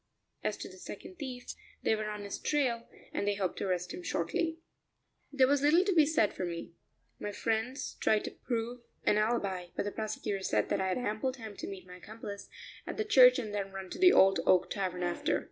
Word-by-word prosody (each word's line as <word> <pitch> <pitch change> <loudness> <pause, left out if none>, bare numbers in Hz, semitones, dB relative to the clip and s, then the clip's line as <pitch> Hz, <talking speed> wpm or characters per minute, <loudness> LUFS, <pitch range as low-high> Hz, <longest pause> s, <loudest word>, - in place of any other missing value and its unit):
As - - -1
to - - -6
the - - -13
second 370 - -9
thief, 255 -4 -6 0.3
they 220 - +3
were 215 0 -3
on 210 -1 -5
his 200 - -5
trail, 255 -6 0 0.2
and 200 - -1
they 205 - +2
hoped 190 -3 -2
to - - -1
arrest 180 -1 -1
him - - -6
shortly. 320 - -1 0.7
There 275 -2 +5
was 280 +1 +3
little 320 +6 +5
to 395 - +2
be 315 -4 +6
said 295 -10 +2
for - - -4
me; 170 -1 -5 0.5
my 205 - -3
friends 225 +5 -2
tried 215 -1 +3
to - - -4
prove 240 0 -3 0.2
an 210 - +3
alibi, 200 -5 0
but - - 0
the 205 - -2
prosecutor 215 -2 -3
said - - +1
that 195 - +1
I 190 - +1
had 185 - 0
ample 245 +2 -1
time 225 -5 -9
to - - -5
meet 190 -2 -8
my 180 0 -11
accomplice 205 +1 -8 0.4
at - - -4
the 435 - 0
church 250 -10 +8
and 220 -5 -4
then 195 -1 -2
run 190 -1 -7
to - - -6
the 365 0 +8
Old 195 -2 +6
Oak 185 -1 +4
Tavern 185 -3 -2
after. 175 0 0
215 Hz, 220 wpm, -32 LUFS, 195-255 Hz, 0.7 s, church